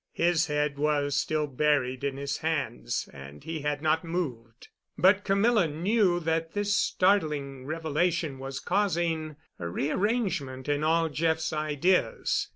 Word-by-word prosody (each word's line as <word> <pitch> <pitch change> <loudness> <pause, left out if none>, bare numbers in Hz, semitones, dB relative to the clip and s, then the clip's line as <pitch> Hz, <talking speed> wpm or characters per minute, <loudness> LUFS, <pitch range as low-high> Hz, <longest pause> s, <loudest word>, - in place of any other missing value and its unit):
His 170 -1 +2
head 150 -1 -1
was 145 -2 +1
still 155 +1 0
buried 140 -2 0
in 140 -1 -2
his 140 0 -3
hands, 150 - -2
and 70 +1 -11
he 160 -1 -4
had 145 0 -2
not 160 +1 +2
moved. 130 -10 -5 0.3
But 195 +2 +4
Camilla 200 -1 +3
knew 180 +4 +1
that 165 0 -1
this 205 0 0
startling 150 -11 +1
revelation 160 -1 -1
was 135 0 -5
causing 170 -5 0 0.2
a 85 -1 -4
rearrangement 155 - -1
of 145 0 0
all 165 +1 +2
Jeff's 160 +1 0
ideas. 155 +4 +1
155 Hz, 135 wpm, -28 LUFS, 140-175 Hz, 0.3 s, But